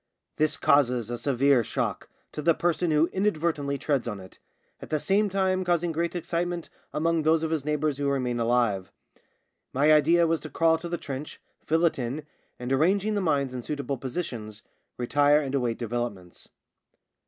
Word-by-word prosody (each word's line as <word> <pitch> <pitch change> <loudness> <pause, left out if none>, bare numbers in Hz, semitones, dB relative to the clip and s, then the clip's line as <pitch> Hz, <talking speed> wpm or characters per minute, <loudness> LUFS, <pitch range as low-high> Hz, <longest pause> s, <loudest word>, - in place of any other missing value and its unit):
This 155 0 +2
causes 125 -5 +2
a 120 - -2
severe 135 +1 +3
shock - - -3 0.2
to 150 - -5
the 165 +1 +3
person 175 0 0
who 155 +1 +4
inadvertently 160 -7 0
treads 140 -3 -1
on 105 -4 -4
it, 95 0 -14 0.4
at - - -9
the 155 - 0
same 200 +6 +2
time 190 -1 +1
causing 175 -1 +1
great 170 +2 -2
excitement 175 0 -3 0.2
among 165 +1 +1
those 160 +1 +2
of 160 - -1
his 155 -4 -1
neighbours 150 -1 0
who 140 -1 0
remain 125 -3 -1
alive. 115 -5 +1 0.8
My 145 +4 +4
idea 165 +3 +5
was 165 -1 +1
to 155 - -8
crawl 165 0 +2
to 170 +1 -6
the 175 - -2
trench, 140 -1 -7 0.3
fill 165 +2 +3
it 165 - +1
in, 130 +5 -4 0.3
and, 125 +2 -3
arranging 195 +9 +2
the 205 - 0
mines 140 -7 0
in 125 - -4
suitable 140 0 -4
positions, 120 -7 -5 0.3
retire 145 +4 +3
and 140 -3 -4
await 125 -4 0
developments. 115 -6 -5
150 Hz, 175 wpm, -26 LUFS, 125-165 Hz, 0.8 s, idea